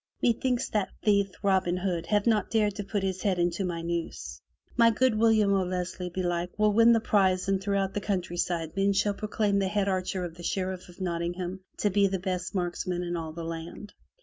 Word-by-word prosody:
Methinks 245 +1 +1
that 210 -3 0
thief, 200 -2 +3
Robin 190 -2 +2
Hood, 180 -3 -2
hath 205 -1 +2
not 215 -4 +2
dared 215 -3 +2
to 205 +1 -5
put 200 0 -2
his 190 -1 -2
head 195 -3 +1
into 175 +2 0
my 170 -2 -3
noose. 170 0 -4 0.3
My 230 -1 +6
good 250 +2 +2
William 215 -2 +4
O'Leslie, 180 -1 -2
belike, 175 -1 -2
will 210 -1 +3
win 230 +2 +6
the 225 - +4
prize 190 -4 +2
and 195 -1 +1
throughout 195 -1 0
the 205 - -2
countryside 175 -4 -2
men 195 +1 +2
shall 205 +1 +2
proclaim 205 -1 0
the 195 - +1
head 200 0 0
archer 185 -1 -1
of 170 - -7
the - - -9
Sheriff 185 0 -3
of 175 - -13
Nottingham 175 +1 -3 0.2
to 205 - +2
be 200 +1 +4
the 190 0 -1
best 185 +1 -3
marksman 180 0 -2
in 175 0 -3
all 165 -2 -4
the 165 +1 -6
land." 165 +5 -7
190 Hz, 200 wpm, -28 LUFS, 175-205 Hz, 0.3 s, My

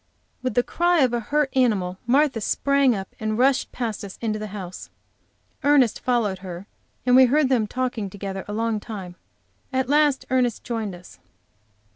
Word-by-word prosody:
With 255 - -2
the 245 - +4
cry 345 +2 +2
of 255 -3 +3
a 240 - +1
hurt 285 +5 0
animal, 195 -8 +1
Martha 265 -2 +3
sprang 280 +2 +2
up 190 -1 -7
and 215 0 -2
rushed 265 +2 +2
past 230 -5 -4
us 195 -2 -8
into 215 -2 -2
the 215 - -5
house. 190 -3 -8 0.7
Ernest 280 -6 +4
followed 230 -7 0
her, 180 0 -8 0.4
and 250 0 +5
we 260 0 +8
heard 275 +2 +2
them 235 -5 +2
talking 245 -4 -2
together 195 0 -6
a 205 - -5
long 225 0 -1
time. 195 -5 -8 0.6
At 260 -1 -1
last 290 -2 +3
Ernest 250 -3 +1
joined 220 -6 -3
us. 175 - -15
235 Hz, 170 wpm, -23 LUFS, 205-260 Hz, 0.7 s, we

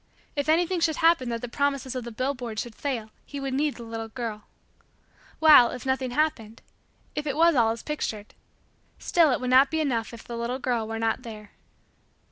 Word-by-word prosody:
If 285 +1 -1
anything 345 +3 +2
should 325 -2 +1
happen 325 -7 +3
that 230 -1 -3
the 245 - -4
promises 275 0 -1
of 255 -2 -4
the 235 - -6
billboards 245 -2 -3
should 240 - -11
fail 230 -4 -4
he 285 - -7
would 270 -1 -3
need 290 +2 0
the 235 - -9
little 225 0 -5
girl. 220 -2 -6 0.9
While, 300 -7 +8
if 250 - -7
nothing 265 -1 0
happened 245 -6 -2 0.5
if 300 0 -4
it 285 0 -2
was 335 +1 +5
all 235 -5 +3
as 225 0 -4
pictured 220 -8 -4 0.6
still 330 -4 +3
it 250 - +1
would 250 -1 -2
not 265 +2 +6
be 320 - -1
enough 245 -7 -1
if 235 -2 -10
the 235 - -7
little 235 +2 -2
girl 245 -4 -1
were 225 0 -4
not 225 +1 0
there. 215 -4 -10
255 Hz, 200 wpm, -26 LUFS, 230-285 Hz, 0.9 s, While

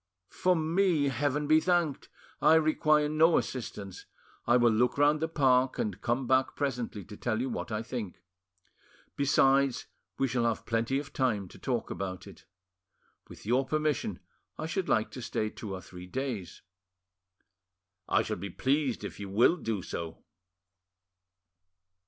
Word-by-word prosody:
For 185 0 +2
me, 165 -2 +2
Heaven 145 +3 -1
be 155 +2 +5
thanked! 170 -5 0 0.3
I 160 - +6
require 155 -1 +3
no 160 +2 +4
assistance. 100 -6 -5 0.4
I 120 +1 +5
will 120 -1 +4
look 120 +4 +2
round 145 +1 +4
the 160 - 0
park, 130 -5 +2
and 105 -4 -3
come 125 +3 0
back 130 +1 +2
presently 125 -8 -3
to 105 - -10
tell 110 0 -2
you 130 +1 -2
what 115 - -4
I 110 +1 -2
think. 115 -6 -6 1.0
Besides, 140 -1 +3 0.3
we 135 - +1
shall 120 -1 0
have 115 -2 -1
plenty 115 +4 0
of 140 0 -6
time 110 -8 0
to - - -14
talk 125 -4 -2
about 95 -2 -5
it. - - -14 0.8
With - - -12
your 125 +5 +2
permission, 150 +1 -1 0.4
I - - -4
should 185 +3 -2
like 110 -1 +2
to 130 - -7
stay 110 -2 -2
two 105 - -8
or 95 - -7
three 90 0 -11
days." 120 -4 -5 1.5
"I - - +3
shall - - -3
be 100 +3 -6
pleased 135 - 0
if - - -7
you 100 -1 -6
will 115 - +4
do 115 - -3
so." 85 -1 -6
130 Hz, 155 wpm, -30 LUFS, 110-150 Hz, 1.5 s, I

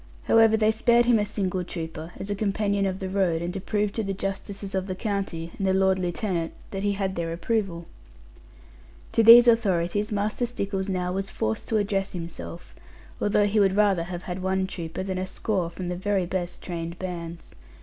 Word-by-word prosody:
However, 225 -1 +5
they 215 0 +4
spared 235 +2 +3
him 235 -2 +4
a 205 - +1
single 190 -3 -2
trooper, 165 -1 -6
as 195 - -4
a - - 0
companion 200 -1 0
of 190 -1 -2
the 190 - -4
road, 185 -4 +1
and 175 +1 -3
to 195 - -4
prove 205 +1 -1
to 225 - -1
the 195 -1 -2
justices 195 0 -4
of 190 0 -1
the 185 - -3
county, 190 -5 -3
and 195 - 0
the 190 - +3
lord 190 0 +3
lieutenant, 175 -1 -2 0.2
that 195 - -3
he 205 0 +1
had 195 -1 -2
their 165 -1 -2
approval. 175 -1 -2 1.3
To - - +3
these 235 +2 +10
authorities 205 -3 +2
Master 210 +4 0
Stickles 200 -4 -3
now 180 -1 -1
was 195 +1 -3
forced 110 0 -2
to 220 - +1
address 200 -1 -1
himself, 170 0 -7 0.5
although 205 0 +3
he 210 +1 +2
would 195 -2 +3
rather 200 -5 +3
have 175 0 -6
had 180 +1 -5
one 190 0 0
trooper 170 -1 -5
than 190 -1 -3
a 185 - -2
score 190 -2 -1
from 175 +1 -6
the 180 - -2
very 190 0 0
best 175 -1 -4
trained 170 -1 -5
bands. 170 -2 -6
190 Hz, 200 wpm, -26 LUFS, 180-205 Hz, 1.3 s, these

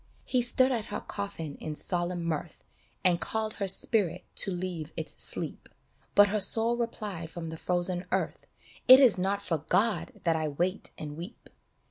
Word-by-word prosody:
He 255 - +2
stood 255 +2 +3
at 230 -4 -1
her 205 - -4
coffin 185 -8 -6
in 155 -1 -5
solemn 175 +1 -2
mirth 165 0 -4 0.4
And 175 -2 +3
called 220 +4 -1
her 200 - -1
spirit 185 -2 +1
to - - +5
leave 175 -3 -4
its 160 - -2
sleep, - - -1 0.5
But 205 0 +7
her 215 +2 0
soul 225 +4 +3
replied 210 -8 -4
from 165 -1 -6
the 160 - -6
frozen 180 +1 0
earth, - - -2 0.2
" - - -20
It 255 +1 +11
is 245 -9 +5
not 200 +2 -1
for 165 -5 -1
God 190 +6 0
that 165 -2 +2
I 155 -1 -1
wait 175 +7 -2
and 150 -1 -6
weep 170 +5 -10
185 Hz, 175 wpm, -29 LUFS, 165-210 Hz, 0.5 s, It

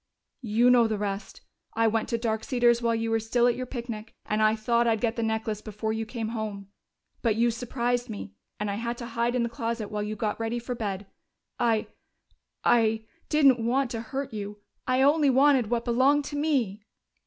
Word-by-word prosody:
"You 235 +1 +3
know 240 -2 +5
the 220 -1 -1
rest. 200 -1 -4 0.3
I 225 +1 +3
went 225 0 +1
to 235 - 0
Dark 220 -1 -1
Cedars 240 -2 +3
while 230 -1 +1
you 225 0 -1
were 225 - +2
still 235 +2 +1
at 245 - +4
your 255 0 -5
picnic, 235 -3 -6
and 215 0 0
I 215 0 +4
thought 235 +2 +1
I'd 225 -1 +2
get 230 0 0
the 230 - -2
necklace 220 -1 -1
before 215 +1 -3
you 220 0 -3
came 225 -2 -4
home. 210 -3 -5 0.5
But 225 -4 +2
you 235 +1 +3
surprised 245 +1 -2
me, 150 - -7 0.3
and 210 -1 -1
I 200 - -3
had 235 +1 -3
to 240 - -6
hide 235 +1 -1
in 245 - +2
the - - 0
closet 230 -2 -4
while 210 0 -2
you 210 +1 -3
got 210 0 -2
ready 225 +1 -1
for 240 +1 -4
bed.... 205 -4 -4 0.5
I 230 -3 +2 0.8
I 220 -1 +3 0.2
didn't 275 -6 +4
want 250 +2 +1
to 225 - -3
hurt 265 +3 -5
you! 205 -1 -5 0.3
I 255 +1 +3
only 290 +1 +4
wanted 265 -3 +4
what 235 -1 0
belonged 265 +4 +3
to 290 - -5
me!" 265 -9 0
230 Hz, 205 wpm, -27 LUFS, 220-245 Hz, 0.8 s, know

